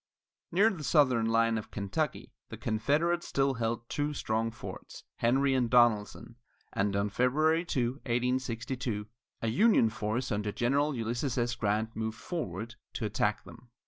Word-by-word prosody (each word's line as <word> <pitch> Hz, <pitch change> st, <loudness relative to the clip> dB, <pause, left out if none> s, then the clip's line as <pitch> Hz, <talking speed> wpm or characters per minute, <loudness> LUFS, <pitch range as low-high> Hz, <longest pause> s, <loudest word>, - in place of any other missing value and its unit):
Near 205 Hz, +6 st, +4 dB
the 165 Hz, -6 st, -7 dB
southern 130 Hz, -8 st, +3 dB
line 115 Hz, 0 st, +2 dB
of 110 Hz, -, -10 dB
Kentucky, 105 Hz, +9 st, -3 dB, 0.2 s
the -, -, -7 dB
Confederates 150 Hz, +10 st, 0 dB
held 120 Hz, -4 st, 0 dB
two 145 Hz, +3 st, -2 dB
strong 110 Hz, -2 st, -1 dB
forts, 115 Hz, -, -9 dB
Henry 135 Hz, +3 st, +2 dB
and 125 Hz, -3 st, +1 dB
Donelson, 120 Hz, -1 st, +2 dB, 0.4 s
and 100 Hz, 0 st, 0 dB
on 100 Hz, +1 st, 0 dB
February 155 Hz, +8 st, +2 dB
2, 125 Hz, -6 st, -1 dB
1862, 120 Hz, -2 st, -2 dB, 0.4 s
a -, -, +1 dB
Union 125 Hz, -, +4 dB
force 115 Hz, +2 st, -2 dB
under 105 Hz, 0 st, -1 dB
General 140 Hz, +6 st, +1 dB
Ulysses 120 Hz, +3 st, -2 dB
S. 120 Hz, 0 st, +1 dB
Grant 110 Hz, 0 st, -1 dB
moved 110 Hz, 0 st, -3 dB
forward 115 Hz, -, -5 dB, 0.2 s
to -, -, -3 dB
attack -, -, 0 dB
them. 125 Hz, -, -14 dB
120 Hz, 145 wpm, -30 LUFS, 110-140 Hz, 0.4 s, Near